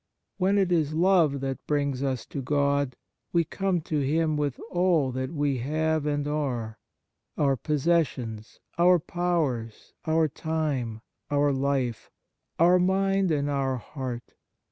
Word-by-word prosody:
When 195 Hz, +1 st, +2 dB
it 190 Hz, -3 st, +2 dB
is 155 Hz, -3 st, +1 dB
love 165 Hz, -5 st, +3 dB
that 135 Hz, -1 st, -3 dB
brings 140 Hz, -3 st, 0 dB
us 130 Hz, -4 st, -2 dB
to 140 Hz, -, -5 dB
God, 140 Hz, -1 st, +1 dB, 0.4 s
we 170 Hz, -1 st, +3 dB
come 185 Hz, +2 st, -1 dB
to 155 Hz, -1 st, -2 dB
Him 155 Hz, +3 st, +1 dB
with 145 Hz, -3 st, -1 dB
all 175 Hz, -7 st, +2 dB
that 130 Hz, +1 st, -3 dB
we 145 Hz, -4 st, 0 dB
have 155 Hz, +3 st, 0 dB
and 145 Hz, -1 st, -1 dB
are: 125 Hz, -8 st, -2 dB, 0.6 s
our 140 Hz, -2 st, +3 dB
posses 155 Hz, +4 st, +2 dB
sions, 110 Hz, -3 st, -8 dB, 0.2 s
our 180 Hz, +1 st, +6 dB
powers, 160 Hz, -10 st, -2 dB
our 160 Hz, 0 st, +3 dB
time, 145 Hz, -7 st, -2 dB, 0.3 s
our 145 Hz, -1 st, +2 dB
life, 135 Hz, -3 st, -1 dB, 0.5 s
our 175 Hz, +2 st, +5 dB
mind 195 Hz, +1 st, +2 dB
and 145 Hz, -3 st, +1 dB
our 135 Hz, -2 st, 0 dB
heart. 125 Hz, -2 st, -6 dB
145 Hz, 140 wpm, -27 LUFS, 135-165 Hz, 0.6 s, our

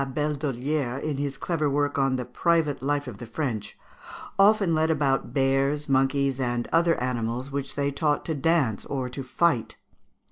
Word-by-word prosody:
de -, -, 0 dB
Labédollière, 140 Hz, -2 st, -2 dB
in 150 Hz, -3 st, -2 dB
his 140 Hz, -1 st, -3 dB
clever 155 Hz, -1 st, -1 dB
work 145 Hz, 0 st, 0 dB
on 135 Hz, -1 st, +2 dB
"The 125 Hz, -1 st, -3 dB
Private 165 Hz, -2 st, +1 dB
Life 145 Hz, +1 st, 0 dB
of 115 Hz, -6 st, -8 dB
the 120 Hz, -, -8 dB
French," 115 Hz, -3 st, -4 dB, 0.6 s
"often 195 Hz, -3 st, +5 dB
led 160 Hz, 0 st, +2 dB
about 140 Hz, -4 st, +1 dB
bears, 135 Hz, +2 st, +1 dB
monkeys, 135 Hz, 0 st, +2 dB
and 120 Hz, -2 st, -1 dB
other 165 Hz, 0 st, +4 dB
animals, 125 Hz, +1 st, -2 dB
which 140 Hz, -1 st, -4 dB
they 140 Hz, 0 st, 0 dB
taught 145 Hz, +1 st, 0 dB
to 160 Hz, -, -1 dB
dance 145 Hz, -7 st, +1 dB
or 130 Hz, -2 st, -3 dB
to 130 Hz, +2 st, -6 dB
fight 130 Hz, -1 st, +1 dB
(Figs. -, -, -36 dB
140 Hz, 175 wpm, -26 LUFS, 130-150 Hz, 0.6 s, often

